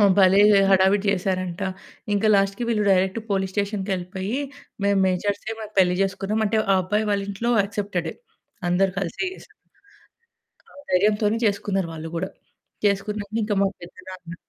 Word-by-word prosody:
ఆహ్, 200 -1 +6
భలే 190 0 +6 0.3
హడావిడి 195 +1 +4
చేసారంట! 185 -2 -2 0.5
ఇంక 205 +1 0
లాస్ట్‌కి 195 +4 +1
వీళ్ళు 215 -3 +1
డైరెక్ట్ 190 +2 +2
పోలీస్ 190 -1 0
స్టేషన్‌‌కెళ్ళిపోయి 195 +1 -2 0.5
మేము 200 0 +3
మేజర్స్‌కి 200 +4 -1
మాకు 215 -1 -8
పెళ్లి 180 -1 +4
చేసుకున్నామంటే 210 +3 0 0.2
ఆ - - +4
అబ్బాయి 210 +4 0
వాళ్ళింట్లో 200 +3 -1
యాక్సెప్టెడే 200 -4 -3 0.6
అందరు 185 +2 +2
కలిసే 195 - -2
చేసారు. - - -17 1.1
ఆ - - -20 0.2
ధైర్యంతోనే 210 +3 +2
చేసుకున్నారు 200 -3 -1
వాళ్ళు 160 0 -7
గూడా. 185 +3 -3 0.6
చేసుకున్నాక 210 +2 -1
మా 195 - +3
పెద్దనాన్న 180 0 -10
195 Hz, 125 wpm, -23 LUFS, 185-205 Hz, 1.1 s, ఆహ్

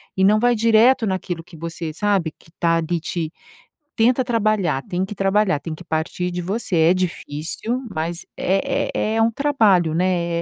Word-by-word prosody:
E 190 - +1
não 210 +2 +5
vai 245 +2 +3
direto 230 +2 +4
naquilo 185 -3 -3
que 165 -1 -15
você 165 0 -5
sabe 195 -2 0
que 165 - -22
tá 165 -1 +3
ali 165 +1 -1
te 165 -1 -4 0.6
tenta 245 +3 +3
trabalhar, 215 - 0
tem 180 +1 -2
que 210 - -8
trabalhar, 195 -4 +2
tem 155 +3 -6
que 180 - -12
partir 170 +2 -2
de 175 - -4
você. 195 +2 -2
É 165 +1 +5
difícil, 185 - -3
mas 165 -1 -3
é 195 +2 0
é 215 +1 -1
é 225 - +2
um 230 - +2
trabalho, 215 - +2
né? 170 -1 0
185 Hz, 180 wpm, -21 LUFS, 165-215 Hz, 0.6 s, não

